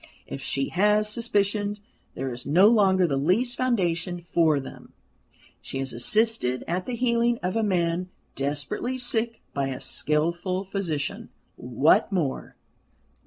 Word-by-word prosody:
If 135 - -7
she 135 +1 -2
has 210 +4 +3
suspicions 205 -2 -1 0.3
there 130 -1 -3
is 120 - -7
no 180 +9 +5
longer 190 -5 +4
the 140 -5 0
least 210 - +1
foundation 180 -8 0
for 165 -3 +2
them; 135 - -11 0.7
she - - -6
has 135 -1 -3
assisted 130 - +1
at 180 +2 -2
the 250 - -2
healing 235 0 +1
of 180 +2 -1
a 225 - +2
man 180 -3 0 0.3
desperately 145 - -2
sick 235 -2 -1
by 140 -1 -1
a 130 -1 -4
skilful 170 +5 -1
physician. 180 -7 -3 0.3
What 145 - +2
more? 165 -9 -2
185 Hz, 135 wpm, -25 LUFS, 150-215 Hz, 0.7 s, no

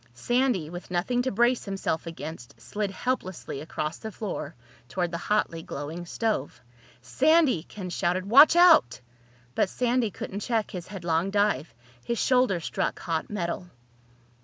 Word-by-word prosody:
Sandy, 240 - +1
with 175 +3 -8
nothing 190 +8 0
to 260 - -1
brace 240 +4 +2
himself 195 -5 -2
against, 155 -5 -8
slid 205 -1 -3
helplessly 190 - -3
across 155 +1 -4
the 220 - -6
floor 190 -7 -5 0.3
toward 175 +3 -1
the 170 - -3
hotly 210 -6 +1
glowing 160 +3 -6
stove. 215 - -2 0.4
"Sandy!" 265 - +3
Ken 185 +1 -8
shouted. 180 +1 0
"Watch 280 +10 +8
out!" 340 - +6 0.5
But 190 - +1
Sandy 245 -1 +1
couldn't 200 +1 -6
check 225 0 -1
his 180 -3 -6
headlong 175 -2 -1
dive. 200 -7 +1 0.3
His 235 - -2
shoulder 250 -9 +3
struck 165 - -2
hot 165 -2 -3
metal. 180 -3 -3
190 Hz, 140 wpm, -27 LUFS, 165-235 Hz, 0.5 s, Watch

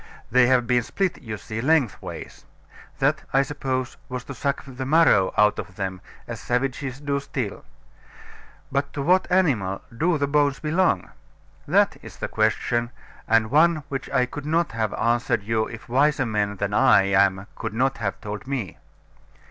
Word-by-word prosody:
They 125 +1 +5
have 125 -1 +3
been 125 0 +2
split, 185 - -2
you 110 -5 -5
see, 110 +2 -5
lengthways; 140 -4 -1 0.5
that, - - +1
I 135 +1 +5
suppose, 130 -3 -3
was 125 -1 -4
to 135 - -8
suck 140 +1 -2
the 130 -1 -6
marrow 135 - +4
out 105 0 +4
of 95 - -7
them, 95 -2 -4 0.3
as - - -6
savages 130 +1 -2
do 140 -1 -1
still. 130 -6 -5 1.1
But 140 +1 -1
to 140 - -3
what 185 +3 +3
animal 125 - +1
do 165 +5 +1
the 140 - +1
bones 145 -1 +2
belong? 155 - +1 0.6
That - - +3
is - - -12
the - - -3
question, 120 0 0 0.4
and 110 0 +3
one 155 +1 +4
which 135 -1 -4
I 130 -2 +2
could 145 +3 -8
not 165 0 +1
have 110 -2 -1
answered 120 -2 +1
you, 110 +1 0
if 115 0 -10
wiser 140 +2 +2
men 105 -3 -1
than 100 +1 -3
I 110 -4 +5
am 95 0 +2
could - - -5
not 130 +3 +1
have 100 -3 -3
told 105 +2 -6
me. 130 -10 -4
125 Hz, 165 wpm, -24 LUFS, 110-140 Hz, 1.1 s, They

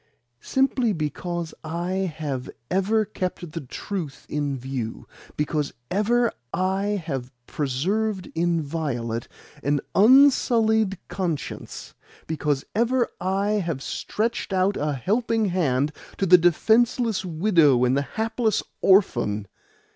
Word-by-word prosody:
Simply 260 -4 +1
because 165 +1 -3
I 175 +3 -2
have 140 -5 -4 0.2
ever 210 +4 +2
kept 180 -4 -4
the 165 - -5
truth 155 +2 -6
in 145 -2 -2
view, 125 -3 -5 0.3
because 150 -1 -1 0.2
ever 230 +5 +2 0.2
I 195 +2 0
have 135 -5 -4
preserved 185 +8 -1
inviolate 150 -8 -1 0.3
an 145 0 +1
unsullied 220 -4 +5
conscience, 175 -6 -4 0.3
because 150 -3 -1
ever 240 +2 +2
I 195 +3 0
have 160 -6 -3
stretched 230 0 -2
out 190 +1 +2
a 150 0 -1
helping 220 - 0
hand 150 -6 +1 0.3
to 195 - +1
the 180 0 +8
defenceless 220 +5 +3
widow 160 - +3
and 125 +1 +2
the 140 - +2
hapless 220 - -1 0.2
orphan!" 120 - +3
180 Hz, 110 wpm, -24 LUFS, 145-215 Hz, 0.3 s, the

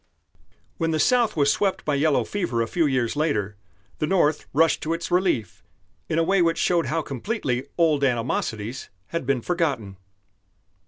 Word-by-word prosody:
When 165 - 0
the 160 -1 0
South 240 -1 +2
was 145 -1 +4
swept 195 -2 -1
by 150 - 0
yellow 145 0 +2
fever 170 - -1
a - - -4
few 165 +5 +1
years 130 -3 0
later, 105 -10 -1 0.4
the 155 - 0
North 155 -4 +1
rushed 160 +3 +3
to 160 - -1
its 170 0 -6
relief 175 - 0 0.5
in 155 - 0
a 165 - +3
way 190 +2 +2
which 165 -1 +2
showed 175 -2 +1
how 165 0 -1
completely 135 - -3
old 155 -4 +3
animosities 120 -2 -2 0.2
had 165 -6 -4
been 140 -3 +1
forgotten. 140 - -1
155 Hz, 165 wpm, -24 LUFS, 125-170 Hz, 0.5 s, was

